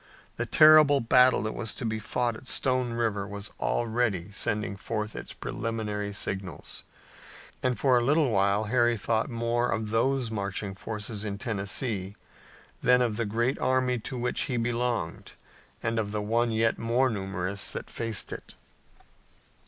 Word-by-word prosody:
The - - -3
terrible 155 -2 +7
battle 125 +1 +5
that 110 - -2
was 110 - -2
to 125 - -5
be 110 -1 -1
fought 120 +2 -1
at 125 - -11
Stone 130 -2 +1
River 110 -4 -1
was 100 +1 -7
already 110 -5 0
sending 105 -1 -1
forth 105 +1 -4
its - - -7
preliminary 105 -2 -3
signals, 95 -2 -4 0.8
and 125 -1 0
for 130 -3 +4
a - - -1
little 145 +1 +3
while 100 +1 +2
Harry 120 +1 +2
thought 110 +6 0
more 120 0 0
of 110 -1 -2
those 125 +1 +1
marching 100 -1 -3
forces 105 +1 -5
in 100 -2 -3
Tennessee 100 -2 -2 0.7
than 125 0 +5
of 115 -3 0
the 115 - -1
great 120 +5 0
army 130 -1 +1
to 125 +4 -6
which 125 0 -1
he 125 - 0
belonged 120 -6 -2 0.5
and 115 0 0
of 105 -2 -2
the 105 0 -2
one 115 +3 +1
yet 115 0 +1
more 120 +3 +2
numerous 95 -3 -2
that - - -5
faced 115 -3 -2
it. - - -10
115 Hz, 155 wpm, -28 LUFS, 105-125 Hz, 0.8 s, terrible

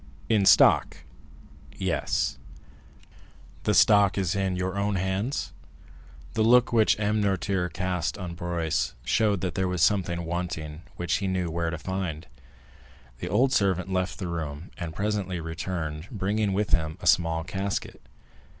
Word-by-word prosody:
"In 105 -4 +3
stock?" - - +5 0.7
"Yes." 65 -1 -1 1.3
"The - - +2
stock 100 -2 +5
is 95 -3 0
in 95 -2 0
your 95 +1 -2
own 100 0 0
hands?" 95 +7 -2 0.8
The 110 - 0
look 120 +2 +5
which 110 -2 +4
M. 105 0 +1
Noirtier 95 -2 0
cast 90 -2 -2
on 90 -3 -5
Barrois 85 -2 -1
showed 105 - +2
that 95 -2 -2
there 95 0 0
was 90 -2 0
something 85 -4 +1
wanting 80 -3 -4
which 85 -2 0
he 100 - -2
knew 90 -3 -1
where 85 0 -1
to 85 - -4
find. 90 -3 -4 0.9
The 90 - -4
old 125 +8 +3
servant 95 -1 +1
left 95 0 -1
the 95 - -4
room, 80 -1 -5
and 85 -3 -6
presently 100 -3 -2
returned, 80 -1 -4
bringing 105 -1 -1
with 105 +2 -1
him 80 0 +1
a - - -9
small 80 -2 +3
casket. 95 +3 -4
95 Hz, 145 wpm, -26 LUFS, 85-100 Hz, 1.3 s, stock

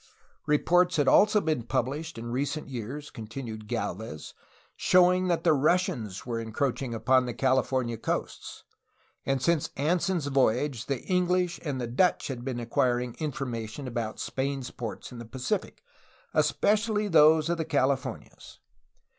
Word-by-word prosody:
Reports 175 +4 +3
had 145 -4 +2
also 210 +6 +5
been 155 -8 0
published 135 +7 -2
in 115 +1 -6
recent 145 +5 -2
years, 135 +4 -6
continued 110 -1 -7
Gdlvez, 110 -7 -4 0.4
showing 180 0 +4
that 170 -2 0
the 165 -3 +5
Russians 135 - 0
were 120 -2 -2
encroach 115 +4 -2
ing 120 -4 -3
upon 125 +3 +3
the 120 - -4
California 130 -2 +1
coasts, - - -4 0.6
and 135 -1 0
since 170 -2 +2
Anson's 170 +2 +1
voyage 130 -2 +1
the 135 -3 -2
English 180 -1 +1
and 145 -5 -3
the 120 - -2
Dutch 130 +11 +1
had 125 -3 -5
been 125 -2 -3
acquiring 120 +1 0
information 130 -4 -4
about 115 -3 -4
Spain's 135 -1 -3
ports 115 -1 -7
in 125 - -9
the - - -6
Pacific, 130 - -4 0.5
especially 215 0 +2
those 155 -2 +5
of 170 0 -1
the 160 - -1
Cali 140 -3 +2
fornias. 130 - -10
135 Hz, 145 wpm, -28 LUFS, 120-160 Hz, 0.6 s, also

